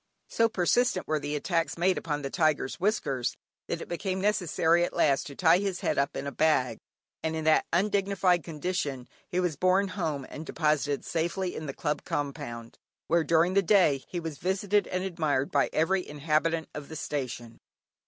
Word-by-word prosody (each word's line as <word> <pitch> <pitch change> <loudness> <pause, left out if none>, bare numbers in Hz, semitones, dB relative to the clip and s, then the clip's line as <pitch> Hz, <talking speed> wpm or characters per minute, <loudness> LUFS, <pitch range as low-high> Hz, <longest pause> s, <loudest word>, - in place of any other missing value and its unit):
So 230 0 +2
persistent 230 +5 +1
were 155 0 +1
the 145 +1 -3
attacks 165 +3 -1
made 180 +2 +3
upon 150 -3 -3
the 135 - -4
tiger's 155 -4 +1
whiskers, 175 - 0 0.3
that - - -3
it - - -7
became 185 +2 -2
necessary 175 -4 +2
at - - -2
last 140 -5 +2
to 140 - -9
tie 170 +2 +5
his 195 -2 -2
head - - 0
up 140 0 0
in - - -4
a 140 - -3
bag, 150 -6 +1 0.4
and 160 0 -2
in 160 - -3
that 155 0 +3
undignified 195 -2 +2
condition 150 -4 -3 0.2
he 180 - 0
was 180 -4 0
borne 185 +3 +3
home 155 -8 -3
and 155 - -8
deposited 150 -3 0
safely 175 +3 -2
in 155 - -5
the 135 - -5
club 150 0 -2
compound, 140 -6 -5 0.3
where 170 0 +2
during 165 +3 +3
the 200 - +4
day, 175 -8 +3
he 175 - -4
was 160 -3 -6
visited 200 +3 +1
and 185 0 -2
admired 155 -7 -1
by 140 - +2
every 180 +4 +1
inhabitant 155 +2 0
of 150 -1 -7
the 160 - -7
station. 125 -6 -5
160 Hz, 185 wpm, -28 LUFS, 145-185 Hz, 0.4 s, tie